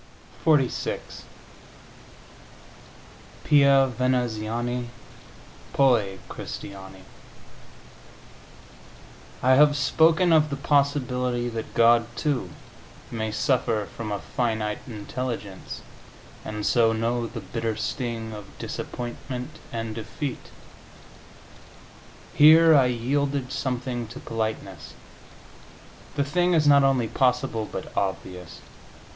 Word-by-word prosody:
XLVI 150 -6 +2 2.5
PIA 140 -2 +5
VENEZIANI, 120 -1 -1 0.8
POI 115 -8 +3
CRISTIANI 95 -1 -8 2.4
I 130 - +4
have 145 +2 +5
spoken 160 +4 +4
of 155 -1 +4
the 140 - -2
possibility 125 -4 0
that 115 -1 -6
God, 115 0 +5
too, 135 -11 -1 0.6
may 110 -2 -3
suffer 115 -3 0
from 110 -2 -5
a 100 - -1
finite 110 -1 -2
intelligence, 110 -3 -6 0.6
and 105 -1 -5
so 115 -2 +3
know 115 +1 -1
the 115 0 -7
bitter 115 +1 -3
sting 115 -1 -4
of 105 -1 -8
disappointment 125 +1 -6
and 115 -1 -4
defeat. 115 +5 -6 1.8
Here 160 +2 +7
I 140 -4 +6
yielded 135 +2 -1
something 125 -3 -3
to 120 +4 -9
politeness; 110 -7 -5 1.2
the 140 - +1
thing 175 +5 +1
is 155 -2 +3
not 140 -1 +7
only 135 -4 +2
possible, 125 -3 0
but - - -7
obvious. 90 -3 -4
120 Hz, 90 wpm, -25 LUFS, 110-140 Hz, 2.5 s, Here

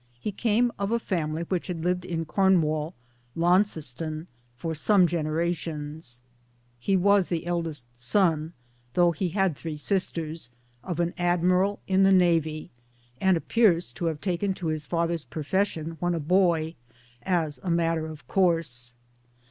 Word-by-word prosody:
He 210 - -3
came 235 +3 +2
of 200 +1 -1
a 235 - +3
family 165 -7 -2
which 175 0 -2
had 170 -3 -4
lived 180 0 0
in 165 -1 -3
Cornwall 160 -4 +2 0.4
(Launceston) 165 -4 +1 0.3
for 165 +5 -3
some 185 +4 +4
generations. 155 -4 -3 0.6
He 190 +10 +2
was 200 0 +4
the 170 -1 -2
eldest 165 -7 -2
son 160 - +1 0.4
though 175 -1 +5
he 175 +3 -2
had 190 -3 +1
three 155 +1 -6
sisters 165 - -2 0.3
of 175 -2 -4
an 175 0 0
Admiral 180 +3 +2
in 190 0 +2
the 195 0 +6
Navy, 165 -4 +2 0.5
and 190 -2 +3
appears 180 - +2
to 170 - -5
have 160 -2 -1
taken 190 +2 -1
to 170 -4 -3
his 150 -2 -5
father's 170 -1 -1
profession, 165 0 -2
when 175 +1 0
a - - -1
boy, 165 -1 +2 0.5
as 160 -6 -1
a 180 - -5
rriatter 165 -1 +1
of 150 -2 -12
course. 155 -10 +1
170 Hz, 145 wpm, -26 LUFS, 155-185 Hz, 0.6 s, the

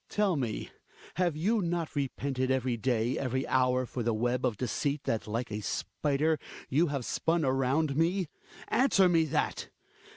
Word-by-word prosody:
Tell 205 -4 +2
me, 120 -7 -3 0.5
have 175 -4 +1
you 210 +7 +2
not 170 -2 -2
repented 135 -2 -1
every 130 -2 +1
day, 120 +1 0
every 130 0 -1
hour, 130 0 +2
for 125 - -5
the 115 -1 0
web 120 +3 +1
of 115 -5 -3
deceit 140 +4 -1
that, 110 - -1
like 115 +2 -3
a 105 +1 -3
spider, 150 +7 0 0.3
you 160 +6 +3
have 140 -4 -3
spun 165 -1 +1
around 135 +3 +1
me? 175 +3 +1 0.4
Answer 230 -8 +4
me 165 -2 +3
that 150 - -1
135 Hz, 160 wpm, -30 LUFS, 125-160 Hz, 0.5 s, Answer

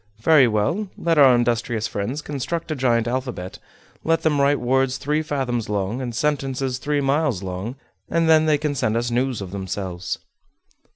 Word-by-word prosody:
Very 155 -6 +6
well; 145 - 0
let 165 -2 +1
our 135 -3 +8
industrious 120 -2 0
friends 125 +9 -3
construct 155 +4 -4
a - - 0
giant 120 -3 +1
alphabet; 125 -7 -4 0.4
let 165 0 +1
them 150 -3 +2
write 140 +1 +3
words 130 +1 +1
three 150 +2 0
fathoms 130 -7 -2
long, 105 +4 -1
and 120 -3 -4
sentences 135 -2 -1
three 145 +1 0
miles 135 - +1
long, 95 +6 -5 0.3
and 165 -1 +1
then 160 -1 +5
they 150 -1 +4
can 150 0 -1
send 115 -5 0
us 120 +1 -1
news 125 -2 0
of 95 -2 -6
themselves." 95 -2 -4
130 Hz, 170 wpm, -22 LUFS, 115-150 Hz, 0.4 s, our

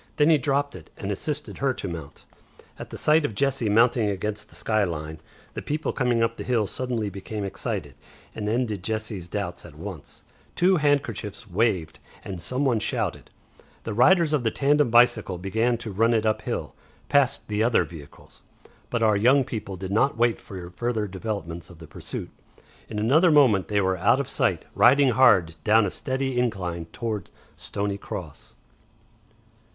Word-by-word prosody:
Then 150 +2 +4
he 155 - +5
dropped 140 0 0
it 85 -4 -12
and 100 - -4
assisted 150 +8 -4
her 135 -2 +1
to - - -5
mount. 80 -5 -8 0.5
At - - -8
the - - -7
sight 155 +1 +3
of 115 -8 -2
Jessie 135 -3 +1
mounting 115 0 +3
against 105 +2 -3
the - - -13
sky 110 -2 +1
line 80 -3 -4 0.3
the - - -5
people 150 +2 -2
coming 120 -3 +1
up 115 0 -1
the - - -5
hill 120 -4 +1
suddenly 115 -1 -3
became 100 +2 -6
excited 100 - -4 0.4
and 105 -1 -3
ended 110 -5 -1
Jessie's 110 -4 -3
doubts 90 -2 -4
at 80 -4 -13
once. 85 -2 -9 0.3
Two 185 +1 +4
handkerchiefs 125 - -1
waved, 95 -5 0 0.3
and 95 -3 -6
some 130 +9 -1
one 120 -4 +2
shouted. - - -2 0.5
The 110 - -4
riders 160 - +4
of 145 -5 +1
the 115 - +2
tandem 145 +2 +2
bicycle 115 -5 +4
began 110 +6 0
to 115 -2 -7
run 115 +4 +2
it 110 -1 +1
up 110 0 +1
hill, - - -4 0.3
past 140 -3 +2
the 105 0 -1
other 115 0 +3
vehicles. 75 -5 -13 0.5
But 115 -1 0
our 110 -1 +4
young 130 +7 +4
people 105 -6 -6
did 95 +1 -6
not 115 +5 +2
wait 120 0 +2
for 90 -3 -8
further 115 +1 -2
developments 95 -4 -5
of 90 - -13
the 80 - -11
pursuit. 75 - -7 0.6
In 110 - -5
another 140 +12 +4
moment 130 - +4
they 105 -1 +1
were 95 -1 +1
out 100 +8 +3
of 140 - -2
sight, - - 0
riding 135 +2 +5
hard 95 -10 +4
down 110 0 +4
a 95 - -2
steady 130 -2 -2
incline 90 -8 -2
towards 105 +1 -5 0.3
Stoney 100 0 -3
Cross. 85 -7 -8
110 Hz, 175 wpm, -25 LUFS, 95-125 Hz, 0.6 s, he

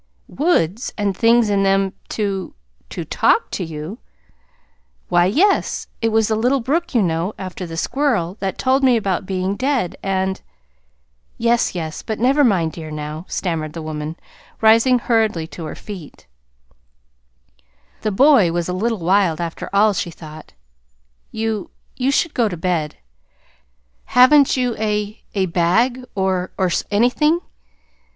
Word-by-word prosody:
"Woods, 240 - 0
and 200 -2 0
things 230 +2 +4
in 200 -1 +2
them 195 0 +2 0.2
to 200 -3 -3 0.3
to - - -5
TALK - - +2
to - - -3
you!" 160 +7 -7 1.1
"Why, 175 0 +4
yes. 370 - +1 0.2
It 225 - +2
was 220 -1 +2
the 220 - +1
little 250 +5 +2
brook, 320 +6 -1
you 230 - +4
know, 170 +3 -1
after 185 -1 -6
the 165 0 -7
squirrel, 235 - 0
that 195 -1 -3
told 265 +1 +1
me 255 -3 +5
about 195 -3 -2
being 190 +1 -1
dead, 255 - -1
and 190 0 -1 0.5
" - - -45
"Yes, 235 -3 +1
yes; 160 -3 -4
but 220 - -4
never 270 +5 +3
mind, 180 -10 +2
dear, 160 0 -8
now," 150 +2 -6
stammered 160 -4 -3
the 165 - -6
woman, 155 0 -5 0.4
rising 230 +3 +5
hurriedly 220 -8 +1
to 165 - -8
her 155 - -6
feet 190 -8 -10 1.8
the 215 - -1
boy 245 - +5
was 170 0 -2
a 180 - -2
little 225 +5 -1
wild, 185 -3 +2
after 170 -1 -5
all, 205 +1 +4
she 175 - -2
thought. 155 -2 -12 0.8
"You 220 -2 -3 0.3
you 255 +1 0
should 295 +3 +1
go 235 -4 +1
to 175 - -5
bed. 165 -3 -2 1.1
Haven't 265 +3 +5
you 250 -2 0
a 210 0 -2
a 195 -1 +2
bag, 185 +9 +1
or 190 -2 0
or 185 -2 +1 0.2
anything?" 250 +10 +2
200 Hz, 145 wpm, -20 LUFS, 175-235 Hz, 1.8 s, me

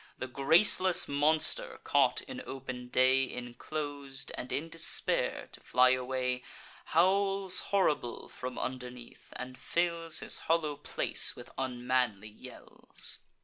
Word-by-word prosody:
The - - -4
graceless 165 - +4
monster, 155 - +1
caught - - +3
in 260 -2 -7
open 130 -2 -6
day, 130 +2 +4
Inclos'd, 140 +3 -5
and 125 - -6
in 155 +4 -2
despair 165 0 0
to - - -10
fly 125 0 +4
away, 130 0 -1 0.4
Howls 195 +2 +3
horrible 150 -11 0
from 125 0 -7
underneath, 125 -2 -7
and 130 0 -7
fills 170 -1 0
His - - -2
hollow 155 -3 +2
palace 145 - -1
with - - -11
unmanly 125 -5 -1
yells. 105 - -7
135 Hz, 115 wpm, -31 LUFS, 125-165 Hz, 0.4 s, graceless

